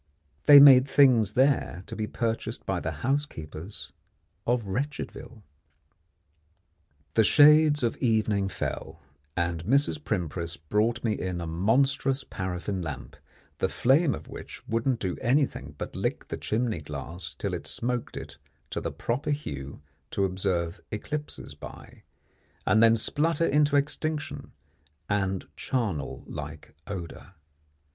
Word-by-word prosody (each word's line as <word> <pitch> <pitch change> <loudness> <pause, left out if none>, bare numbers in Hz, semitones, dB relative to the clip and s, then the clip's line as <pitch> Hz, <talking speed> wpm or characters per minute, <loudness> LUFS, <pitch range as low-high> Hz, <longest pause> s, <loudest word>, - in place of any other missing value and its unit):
They 145 -1 +11
made 135 -2 +9
things 120 -8 +5
there 130 -9 +2
to - - -7
be 110 -1 -2
purchased 115 -1 -3
by - - -1
the - - -5
housekeepers 100 - -3 0.6
of 120 -1 +2
Wretchedville. 125 +1 -5 1.7
The 110 - +5
shades 150 +3 +6
of 115 - 0
evening 110 -4 +1
fell, 90 - -5 0.3
and 85 -2 -1
Mrs. 140 - +2
Primpris 85 -4 -2
brought 105 - 0
me 110 -2 +1
in 90 -3 -3
a 85 - -4
monstrous 130 - +2
paraffin 95 +1 -4
lamp, 70 -6 -6 0.4
the - - +1
flame 140 +4 +3
of 75 - -10
which - - -10
wouldn't 115 +2 0
do 95 -2 -2
anything 125 - 0
but - - -6
lick - - -3
the - - -3
chimney 110 -6 -1
glass 80 +4 -6
till - - -3
it - - -4
smoked 120 0 -3
it - - -8 0.3
to - - -3
the - - -3
proper 125 +5 -2
hue 70 - -4 0.3
to 100 - 0
observe 90 -2 -1
eclipses 150 +8 -5
by, - - -11 0.6
and 110 - +4
then 115 0 +7
splutter 155 +7 +1
into 145 0 +3
extinction 150 +1 -1 0.6
and 95 -2 -1
charnel 105 - -2
like - - -8
odour. 95 -1 -7
110 Hz, 130 wpm, -27 LUFS, 90-135 Hz, 1.7 s, They